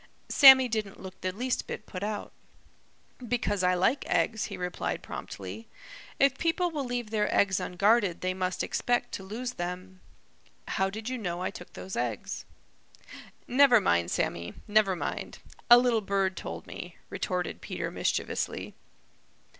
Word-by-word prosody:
Sammy 265 -2 +9
didn't 215 -4 -3
look 190 0 -10
the 185 - -1
least 245 +6 -2
bit - - -6
put 185 - -7
out. 210 0 -3 0.9
"Because 235 -5 -1
I 180 0 +3
like 190 +10 +2
eggs," 220 -2 +1
he - - -6
replied 180 0 -3
promptly. 225 0 -7 0.5
"If 275 -1 +3
people 345 +1 +1
will 295 -3 -2
leave 245 -3 -3
their 210 -1 +1
eggs 190 -2 +3
unguarded 200 0 +2
they 185 0 0
must 185 0 -2
expect 245 0 0
to 195 - -5
lose 240 +6 -5
them. 185 +1 -6 0.7
How 190 0 +1
did 215 +3 -7
you 255 0 -3
know 175 -4 -3
I 185 - -1
took 180 -4 -11
those 190 - -7
eggs?" 120 -3 -3 1.0
"Never 255 -2 +6
mind, 85 - +2
Sammy; 85 0 -2
never 205 -3 +3
mind. - - -4 0.3
A 240 - +11
little 245 -2 +3
bird 195 -1 0
told - - -6
me," - - -9
retorted 180 -3 -3
Peter - - -4
mischievously. - - -2
205 Hz, 150 wpm, -29 LUFS, 185-245 Hz, 1.0 s, A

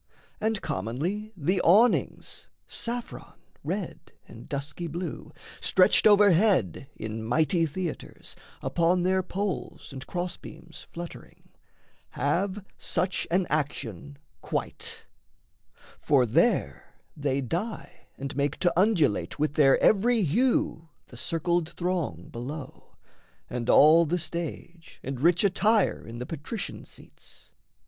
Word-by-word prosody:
And 220 -2 -1
commonly 160 - -3
The 180 +4 +1
awnings, 215 +8 +2 0.2
saffron, 240 0 -6 0.2
red - - -5 0.2
and - - -13
dusky 145 +5 -4
blue, 170 0 -6 0.3
Stretched 185 +3 +4
overhead 200 - +4
in 110 0 -5
mighty 160 - +2
theatres, 170 +2 -6 0.3
Upon 175 +1 +2
their 185 +1 +2
poles 190 -4 -4
and 135 -1 -8
cross 175 0 -3
beams 165 -1 -12
fluttering, 170 0 -10 0.6
Have 190 +7 -1
such 180 +1 -1
an 180 +2 +2
action 140 - -3 0.2
quite; - - -4 0.9
for 135 -4 +3
there 110 - +1 0.2
they 140 -2 -1
dye 175 - -5
And 135 0 -5
make 145 +1 0
to 175 - +3
undulate 175 - +2
with 150 0 0
their 140 -3 +5
every 225 +2 +4
hue 175 - +1 0.2
The 120 - -12
circled 165 +4 -1
throng 170 - -3
below, 135 +5 -8 0.6
and 120 -1 -3
all 160 +2 +7
the 175 +4 +1
stage, 170 0 -6
And 130 -2 -5
rich 170 +4 +4
attire 210 +1 +2
in 115 +1 -8
the 125 - -5
patrician 165 - -6
seats. - - -13
170 Hz, 115 wpm, -27 LUFS, 140-190 Hz, 0.9 s, all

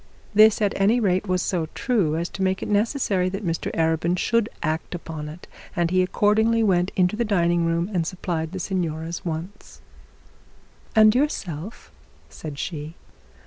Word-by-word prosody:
This 215 +1 +6
at 200 - +2
any 210 +5 +3
rate 190 -2 +1
was 185 -1 +1
so 170 -4 -1
true 200 -12 +1
as 170 +1 -1
to 195 - -7
make 190 0 0
it - - -4
unnecessary 205 -3 +1
that 195 +2 -5
Mr 165 -1 -2
Arabin 165 +2 +1
should 230 +3 +2
not - - -5
act 160 +3 -2
upon 160 -3 -6
it, 160 +4 -11 0.3
and 170 -2 +1
he 185 0 +3
accordingly 220 +4 +2
went 180 -3 +2
into 180 +2 +2
the 235 - 0
dining 175 -5 +2
room 165 +1 0
and 170 -3 0
supplied 165 -3 -3
the 190 - -5
signora's 170 -3 -3
wants. 170 +4 -6 1.2
'And 215 -1 +7
yourself,' 220 - -3 0.4
said 150 -3 -8
she. 155 0 -5
180 Hz, 165 wpm, -24 LUFS, 165-205 Hz, 1.2 s, And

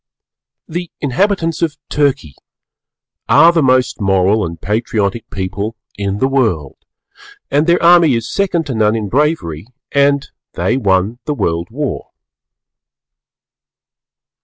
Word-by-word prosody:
The 175 +1 -5
inhabitants 165 +3 0
of 160 -3 -1
Turkey 140 - 0 1.0
are 165 +4 +7
the 165 - +2
most 130 -4 +2
Moral 95 +2 +2
and 85 -1 -5
Patriotic 105 +1 -2
people 100 +4 -4 0.2
in 100 0 -3
the 130 - +1
World, 110 - 0 0.7
and 145 +4 +2
their 170 0 +3
army 170 -5 +6
is 115 0 -3
second 175 -2 -1
to 140 - -4
none 110 -1 +2
in 105 -3 -3
bravery 120 - -1 0.2
and 140 0 +2 0.3
they - - 0
won 100 -1 +1
the 150 - -2
World 85 -6 -2
War. 145 +3 -4
125 Hz, 120 wpm, -16 LUFS, 100-150 Hz, 1.0 s, are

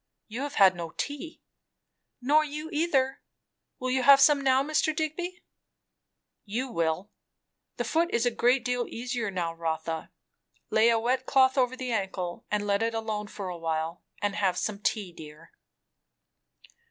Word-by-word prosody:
"You 230 +4 -5
have 285 0 -4
had 190 -2 +6
no 170 -2 -7
tea." 315 +3 -5 0.8
"Nor 295 +5 +4
you, 305 +1 -6
either. 275 -4 +1 0.6
Will 255 0 -2
you 260 0 +2
have 275 +2 +8
some 285 0 +5
now, 265 0 +3
Mr. 310 +1 +1
Digby?" 350 +4 -3 1.0
"You 240 +6 -3
will. 165 +2 -1 0.7
The - - -1
foot 335 +2 +1
is 235 +1 +1
a 245 - +2
great 245 +1 +2
deal 245 -1 0
easier 240 -2 -3
now, 175 -3 -2
Rotha. 160 -1 -3 0.6
Lay 220 +2 +5
a 230 - +4
wet 255 +3 0
cloth 265 -1 +4
over 255 -1 +1
the 255 -1 -4
ankle 190 -5 -3
and 210 0 0
let 200 0 +1
it 230 0 0
alone 215 -2 -3
for 205 -2 -6
a 175 - -5
while; 160 +1 -2 0.2
and 205 -1 0
have 185 -3 +1
some 205 +1 -2
tea, 200 -3 -1
dear." 155 0 -12
235 Hz, 160 wpm, -28 LUFS, 190-270 Hz, 1.0 s, have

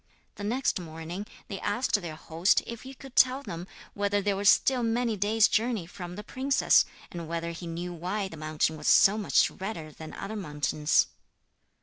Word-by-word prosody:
The 205 - -9
next 240 +1 0
morning 165 +4 -7 0.2
they 195 - -5
asked 205 0 0
their 165 -3 -6
host 165 +4 +2
if 235 -1 -7
he 265 +1 -10
could 270 0 -13
tell 260 +2 +4
them 175 -6 -6 0.3
whether 205 0 +1
they 200 0 +1
were 200 +1 -3
still 255 +4 +5
many 230 0 +1
days' 210 +2 +4
journey 225 -4 0
from 175 0 -8
the 210 - -7
princess, 265 +5 +3 0.3
and 170 -2 -6
whether 170 +1 -3
he 170 +1 -7
knew 175 +2 -4
why 185 +4 -2
the 165 - -10
mountain 155 0 -1
was 150 - -5
so 200 0 +7
much 215 -2 +3
redder 185 -6 -6
than 155 +1 -10
other 220 - -6
mountains. 150 -4 +1
195 Hz, 185 wpm, -28 LUFS, 165-220 Hz, 0.3 s, so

